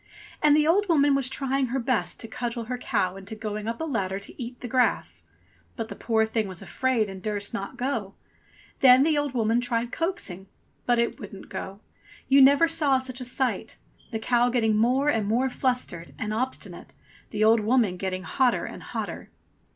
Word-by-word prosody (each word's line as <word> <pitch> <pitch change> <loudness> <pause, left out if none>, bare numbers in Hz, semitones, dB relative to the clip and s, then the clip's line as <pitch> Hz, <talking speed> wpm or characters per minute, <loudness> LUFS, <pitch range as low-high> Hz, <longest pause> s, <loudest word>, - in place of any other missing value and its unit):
And 300 0 +5
the 300 - +3
old 385 +5 +3
woman 290 -3 +4
was 275 -2 +1
trying 270 0 -1
her 250 +3 -2
best 250 -2 -1
to - - -6
cudgel 235 0 -4
her 250 +2 -4
cow 195 -8 -1
into 195 +3 -8
going 215 0 -5
up 230 0 -3
a - - -2
ladder 195 -11 -1
to 200 +5 -9
eat 245 +1 -7
the 250 - -6
grass. 250 +1 0 0.5
But 225 -2 -5
the - - -6
poor 220 -1 +1
thing 220 -1 -1
was 185 -3 -8
afraid 255 -5 0
and 190 -1 -8
durst 205 +1 -3
not 200 -4 -5
go. 230 -7 -2 0.6
Then 255 0 +7
the 310 0 +2
old 290 -3 -1
woman 230 0 +2
tried 240 -1 -1
coaxing, 195 - -3 0.4
but 240 -1 +3
it 235 +4 0
wouldn't 200 -4 -10
go. 195 +1 -6 0.5
You 275 +1 +6
never 280 +5 +6
saw 300 -5 +3
such 260 0 -5
a - - -3
sight! 255 +1 -1 0.3
The 225 - -3
cow 240 +2 +2
getting 225 -3 +2
more 250 +6 +2
and 225 -8 +1
more 245 +5 +1
flustered 250 -10 -2
and 215 -1 -3
ob 255 +4 0
stinate, - - -8 0.4
the 215 0 -1
old 225 +1 +6
woman 215 -3 +2
getting 185 0 -3
hotter 255 +4 +1
and - - -8
hotter. - - -6
240 Hz, 195 wpm, -26 LUFS, 215-265 Hz, 0.6 s, Then